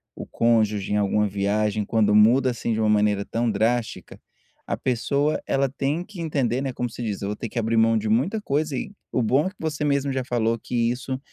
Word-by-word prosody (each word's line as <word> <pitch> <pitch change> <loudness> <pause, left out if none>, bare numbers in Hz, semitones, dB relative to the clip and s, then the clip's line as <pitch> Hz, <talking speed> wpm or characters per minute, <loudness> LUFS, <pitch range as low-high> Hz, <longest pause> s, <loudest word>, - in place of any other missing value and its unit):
o - - -7
cônjuge 110 -4 +1
em - - +2
alguma 105 +1 +2
viagem, 105 +1 0
quando 105 -1 +2
muda 125 +5 +5
assim 115 -1 -2
de 110 - -1
uma 110 -1 +2
maneira 105 -1 +2
tão 115 0 -1
drástica, 115 +3 -1 0.5
a - - -2
pessoa 140 +4 0
ela 135 0 +1
tem 145 +6 -2
que 195 -5 -9
entender, 135 -6 0
né, 135 -1 -2
como 125 0 -3
se 120 - -7
diz, 105 -3 -3
eu 100 - -3
vou 105 - -3
ter 115 - -6
que 120 - -3
abrir 115 0 0
mão 115 0 +4
de 110 0 -2
muita 140 - +1
coisa, 150 -4 -1
e - - -5 0.2
o 125 - +1
bom 130 +8 +2
é - - -1
que 205 - -20
você 155 -1 -3
mesmo 140 -1 +1
já 130 -1 -1
falou 115 -2 0
que 120 - -7 0.2
isso, 130 +1 -4
120 Hz, 230 wpm, -24 LUFS, 110-135 Hz, 0.5 s, muda